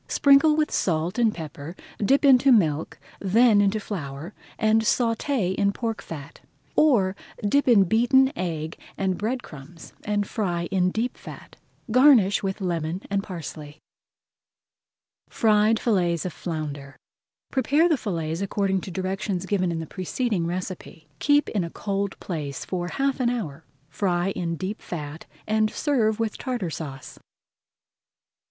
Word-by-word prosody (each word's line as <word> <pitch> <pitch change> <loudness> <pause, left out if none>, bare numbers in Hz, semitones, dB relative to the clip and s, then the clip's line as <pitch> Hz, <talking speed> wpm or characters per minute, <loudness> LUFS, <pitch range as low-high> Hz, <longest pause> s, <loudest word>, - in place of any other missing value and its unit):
Sprinkle 280 +2 +5
with 305 -1 +1
salt 170 +4 0
and 230 -2 +4
pepper, 155 -1 -8 0.3
dip 275 +7 +3
into 270 0 +6
milk, 160 - +2 0.2
then 210 +2 +4
into 205 +2 +2
flour, 160 -3 -6 0.2
and 220 +1 +3
sauté 230 -2 0
in 200 +1 +1
pork 225 +1 -3
fat. 155 -1 -9 0.3
Or, 210 -11 +3 0.3
dip 280 +7 +2
in 225 -6 +6
beaten 245 +7 +4
egg 165 -3 -4
[Page - - -31 0.2
144] - - -5
and 190 -2 0
bread 245 +4 -2
crumbs 155 +3 -12
and 205 -1 0
fry 175 -6 -2
in 185 -2 +2
deep 225 +6 -2
fat. - - -12 0.4
Garnish 245 -6 +5
with 195 0 -3
lemon 170 0 -2
and 200 0 +1
parsley. 155 -5 -8 1.5
FRIED 215 -2 +3
FILLETS 175 -7 +1
OF 180 - -3
FLOUNDER 145 -4 -6 0.5
Prepare 285 +5 +3
the 325 - +3
fillets 165 - -3
according 195 -1 0
to - - -7
directions 190 0 -3
given 185 -3 0
in 165 - -3
the - - -5
preceding 185 - -2
recipe. 175 -3 -6
Keep 290 0 +3
in 200 -5 -1
a 170 - -4
cold 200 +1 -3
place 150 -6 -5
for 175 -2 -3
half 275 +7 -1
an 245 -2 +2
hour, 205 - -4 0.2
fry 175 +2 0
in 170 -3 -3
deep 190 +5 -5
fat, 150 -2 -7 0.2
and 215 0 +2
serve 230 -7 0
with 225 -2 -2
Tartar 240 - -3
Sauce. 135 -5 -7
195 Hz, 145 wpm, -25 LUFS, 170-225 Hz, 1.5 s, into